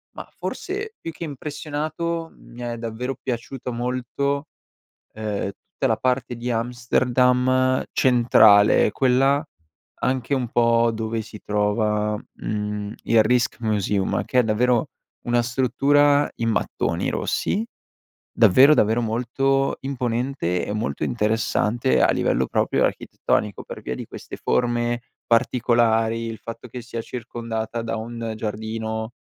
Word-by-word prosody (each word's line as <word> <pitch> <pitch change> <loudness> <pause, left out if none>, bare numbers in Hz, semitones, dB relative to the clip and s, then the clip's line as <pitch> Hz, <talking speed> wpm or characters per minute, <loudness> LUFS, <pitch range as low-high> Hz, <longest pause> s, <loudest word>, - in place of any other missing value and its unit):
Mah, - - -8
forse 415 +3 -4
più 165 - -5
che 170 - -8
impressionato, 155 +3 -4
mi 120 +1 -13
è 120 -1 -4
davvero 115 +3 -4
piaciuto 125 0 -4
molto, 130 +4 -2 0.7
ehm, 105 -2 -3
tutta 135 - -4
la 110 - +1
parte 125 0 -1
di 120 +1 -3
Amsterdam 125 +2 +2
centrale 110 -5 +5
quella 135 +4 +3 0.6
anche 130 +1 0
un 125 -2 -1
po' 115 -1 +3
dove 110 0 -2
si 105 -1 -11
trova, 105 0 0 0.2
mhmm, 105 0 -4
il 115 -2 +4
Rijksmuseum 110 -4 0
che 125 - +2
è - - +4
davvero 120 +5 +1 0.3
una 120 0 +2
struttura 140 +4 +3
in 115 0 -1
mattoni - - -1
rossi, 215 +4 -1 0.7
davvero 130 +7 +6
davvero 110 0 +3
molto 130 +4 0
imponente 125 -7 -2
e 105 - -3
molto 110 +1 -2
interessante 115 +2 +1
a - - +4
livello - - +1
proprio - - +1
architettonico 105 -1 -1
per - - -9
via 65 - -4
di - - -6
queste - - -9
forme 120 -1 0 0.2
particolari, 115 -1 +2
il 110 -1 -5
fatto 115 +2 -9
che 125 +2 -7
sia 115 -1 -5
circondata 115 -1 -5
da 115 0 -3
un 115 0 -5
giardino 110 +1 -4
120 Hz, 125 wpm, -23 LUFS, 110-130 Hz, 0.7 s, davvero